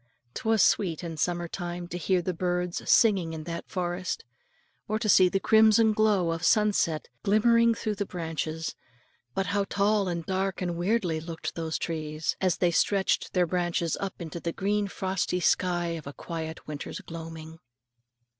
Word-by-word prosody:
'Twas 220 Hz, -2 st, +2 dB
sweet 180 Hz, -5 st, +2 dB
in 165 Hz, -2 st, -5 dB
summertime 175 Hz, +2 st, -3 dB
to 175 Hz, -, -7 dB
hear 180 Hz, +1 st, +1 dB
the 185 Hz, -, -1 dB
birds 180 Hz, 0 st, -1 dB
singing 190 Hz, -8 st, +4 dB
in 155 Hz, -1 st, -6 dB
that 170 Hz, +1 st, -6 dB
forest, 180 Hz, -3 st, -3 dB, 0.6 s
or 215 Hz, -, 0 dB
to 220 Hz, 0 st, -2 dB
see 185 Hz, -3 st, +6 dB
the 195 Hz, -, 0 dB
crimson 220 Hz, +1 st, +5 dB
glow 210 Hz, -5 st, +2 dB
of 165 Hz, 0 st, -4 dB
sunset 205 Hz, -7 st, +2 dB
glimmering 230 Hz, +3 st, +4 dB
through 215 Hz, -1 st, -2 dB
the 205 Hz, -, -2 dB
branches; 160 Hz, -2 st, -3 dB, 0.6 s
but 195 Hz, -, 0 dB
how 200 Hz, +1 st, +1 dB
tall 200 Hz, 0 st, +1 dB
and 170 Hz, -2 st, -3 dB
dark 190 Hz, 0 st, -1 dB
and 175 Hz, -2 st, -2 dB
weirdly 175 Hz, -2 st, 0 dB
looked 160 Hz, -1 st, -6 dB
those 160 Hz, -1 st, -3 dB
trees, 155 Hz, -1 st, -3 dB
as 185 Hz, -2 st, +2 dB
they 175 Hz, -1 st, +2 dB
stretched 190 Hz, +4 st, +1 dB
their 180 Hz, -1 st, +3 dB
branches 175 Hz, -1 st, 0 dB
up 195 Hz, -1 st, -4 dB
into 170 Hz, 0 st, -6 dB
the 170 Hz, -, -3 dB
green 205 Hz, +3 st, 0 dB
frosty 190 Hz, -2 st, -1 dB
sky 175 Hz, -1 st, +1 dB
of 165 Hz, -4 st, -5 dB
a 140 Hz, -, -6 dB
quiet 160 Hz, 0 st, -6 dB
winter's 150 Hz, -1 st, -6 dB
gloaming. 165 Hz, -1 st, -9 dB
180 Hz, 165 wpm, -28 LUFS, 165-200 Hz, 0.6 s, see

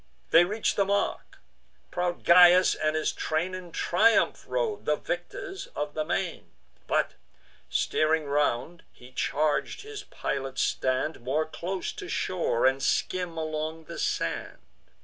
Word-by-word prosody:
They 170 Hz, +1 st, +7 dB
reach'd 210 Hz, +4 st, -1 dB
the 200 Hz, -, +3 dB
mark; 200 Hz, +1 st, -1 dB, 0.5 s
proud 175 Hz, 0 st, -2 dB
Gyas 180 Hz, +1 st, +7 dB
and 155 Hz, 0 st, -1 dB
his 155 Hz, -, +1 dB
train 165 Hz, +4 st, -2 dB
In 185 Hz, -2 st, -7 dB
triumph 180 Hz, +7 st, +2 dB
rode, 465 Hz, -4 st, -2 dB
the 150 Hz, -, +2 dB
victors 175 Hz, -, -5 dB
of 145 Hz, 0 st, -3 dB
the 155 Hz, -, -1 dB
main; 175 Hz, +2 st, -3 dB, 0.4 s
But, -, -, +1 dB, 0.6 s
steering 155 Hz, 0 st, +1 dB
round, 145 Hz, +3 st, 0 dB
he 125 Hz, +1 st, -16 dB
charg'd 150 Hz, +4 st, 0 dB
his 425 Hz, -1 st, -7 dB
pilot 135 Hz, -1 st, -4 dB
stand 130 Hz, +5 st, 0 dB
More 140 Hz, +6 st, 0 dB
close 180 Hz, +4 st, -4 dB
to 180 Hz, -, -8 dB
shore, 170 Hz, -12 st, 0 dB
and 135 Hz, +1 st, +3 dB
skim 180 Hz, +1 st, 0 dB
along 155 Hz, 0 st, -3 dB
the -, -, -8 dB
sand. -, -, -2 dB
165 Hz, 135 wpm, -27 LUFS, 150-185 Hz, 0.6 s, They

